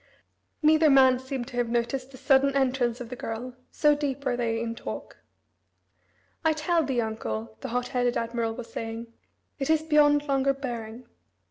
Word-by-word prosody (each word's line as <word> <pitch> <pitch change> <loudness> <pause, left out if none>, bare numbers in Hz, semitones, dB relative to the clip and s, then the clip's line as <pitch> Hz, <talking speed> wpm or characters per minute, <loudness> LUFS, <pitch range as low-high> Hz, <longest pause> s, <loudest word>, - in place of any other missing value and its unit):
Neither 310 0 +5
man 260 -2 +6
seemed 260 -2 -5
to 245 - -8
have 240 -1 0
noticed 240 +3 -1
the 265 - -13
sudden 275 +1 +3
entrance 255 -3 +1
of 235 - -7
the 250 - -5
girl, 245 +2 -6
so 300 -1 +3
deep 280 -1 -3
were 245 - +1
they 230 -2 -1
in 230 0 -3
talk. - - -7 1.3
"I 320 -1 +3
tell 325 +2 +1
thee, 265 -4 -1
uncle," 110 - -4
the - - -4
hot 245 +1 -2
headed 245 -2 0
admiral 230 -1 -2
was 230 -1 -9
saying, 230 +1 -6 0.5
"it 270 - -2
is 315 -1 +3
beyond 295 -1 +4
longer 275 0 +2
bearing. 240 -3 -6
255 Hz, 170 wpm, -27 LUFS, 235-275 Hz, 1.3 s, man